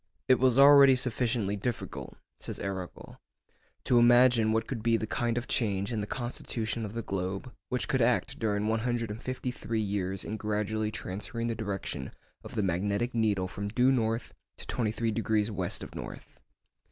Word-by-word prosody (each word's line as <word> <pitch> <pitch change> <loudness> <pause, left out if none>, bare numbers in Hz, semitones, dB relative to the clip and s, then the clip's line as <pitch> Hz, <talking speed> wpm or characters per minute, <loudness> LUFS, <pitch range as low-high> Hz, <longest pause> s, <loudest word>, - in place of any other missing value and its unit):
'It 130 - +5
was 130 -1 +3
already 140 -1 +8
sufficiently 120 -4 +1
difficult,' 115 +4 -5 0.2
says - - -5
Arago, 95 -2 -6 0.6
'to 120 - +4
imagine 120 -2 +5
what 110 0 +1
could 120 -3 -4
be 115 0 +3
the 110 - -3
kind 120 +1 -1
of 120 - -3
change 100 -2 0
in 110 -3 -1
the 105 - -4
constitution 115 -2 -3
of 105 - -7
the 115 0 -4
globe 95 +6 -4 0.2
which 120 -5 -1
could 130 - +1
act 125 +3 +1
during 105 -2 0
one 110 +1 +1
hundred 120 -2 -1
and 105 - -7
fifty 130 0 -3
three 115 -2 -3
years 95 -2 -2
in 110 - -4
gradually 105 0 -1
transferring 110 +3 -4
the 115 - 0
direction 100 - -4 0.3
of - - -10
the 105 - +1
magnetic 100 +6 0
needle 105 -5 +1
from 100 +2 -5
due 125 +5 +3
north 115 -3 0 0.2
to - - -10
23° 110 -2 0
west 95 -3 -2
of - - -9
north. - - -9
110 Hz, 175 wpm, -29 LUFS, 105-120 Hz, 0.6 s, already